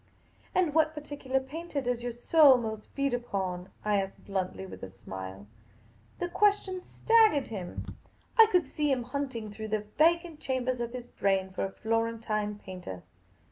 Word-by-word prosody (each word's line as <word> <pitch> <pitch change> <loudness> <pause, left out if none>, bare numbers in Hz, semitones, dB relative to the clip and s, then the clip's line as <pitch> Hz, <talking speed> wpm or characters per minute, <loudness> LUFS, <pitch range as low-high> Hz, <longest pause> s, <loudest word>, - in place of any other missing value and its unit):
" - - -31
And 350 -5 +3
what 315 0 +3
particular 290 -3 -2
painter 300 +3 -5
does 245 -2 -1
your 245 0 -2
soul 270 +3 +6
most 220 -3 -5
feed 275 -2 +1
upon? 190 -6 -2
" - - -26
I 205 -2 +3
asked 195 0 -8
bluntly, 190 -1 -2
with 190 - -10
a 95 - -6
smile. 95 +1 -8 0.7
The 355 - -2
question 390 0 +2
staggered 435 - +4
him. 190 -5 -5 0.5
I 450 -2 +9
could 360 -2 +4
see 295 -1 0
him 255 -2 +1
hunting 250 -4 -4
through 220 +1 -6
the 215 -1 -1
vacanit 335 0 +3
chambers 255 -3 -1
of 235 0 -3
his 250 -1 -5
brain 195 -5 0
for 190 - -2
a 195 - -5
Florentine 220 -1 -1
painter. 180 - -8
240 Hz, 170 wpm, -30 LUFS, 200-295 Hz, 0.7 s, I